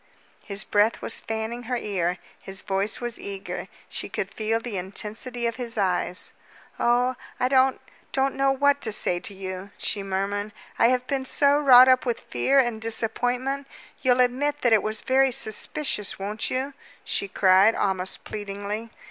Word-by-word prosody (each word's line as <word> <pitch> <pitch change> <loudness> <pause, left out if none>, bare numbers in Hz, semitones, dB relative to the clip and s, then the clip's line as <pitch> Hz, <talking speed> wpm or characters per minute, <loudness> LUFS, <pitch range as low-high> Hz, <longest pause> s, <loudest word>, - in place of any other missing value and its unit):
His 200 +1 -4
breath 210 +2 +2
was - - -2
fanning 225 +2 -4
her 250 - 0
ear, 185 -5 -1 0.2
his 190 0 -7
voice 195 +1 -1
was 240 -1 -4
eager; 195 -1 -6 0.2
she - - -5
could - - -4
feel 225 +1 0
the 230 -2 -6
intensity 215 +6 -5
of 230 0 -1
his 235 -3 -5
eyes. 180 -2 0 0.5
"Oh, 245 +2 +3 0.3
I 250 - +2
don't 260 0 +3 0.3
don't 270 0 +1
know 275 0 +2
what 285 +1 +2
to 220 - 0
say 180 -4 +2
to 200 - -8
you," 190 0 -6
she 205 - -2
murmured. 200 +2 -2 0.3
"I 230 - +6
have 250 0 +1
been 265 0 -2
so 285 +2 +3
wrought 255 -3 +8
up 255 0 +5
with 240 -2 -2
fear 275 +1 +1
and 240 -4 +2
disappointment. 245 +5 0 0.3
You'll 255 -1 +4
admit 285 +4 0
that 240 -2 +4
it 215 - +5
was 215 +2 -2
very 265 0 +3
suspicious, 220 0 +1
won't 205 +3 -3
you?" 265 +2 -2 0.3
she 200 - -1
cried, 190 +3 +5
almost 190 -1 -1
pleadingly. 205 +2 -5
225 Hz, 165 wpm, -25 LUFS, 200-255 Hz, 0.5 s, wrought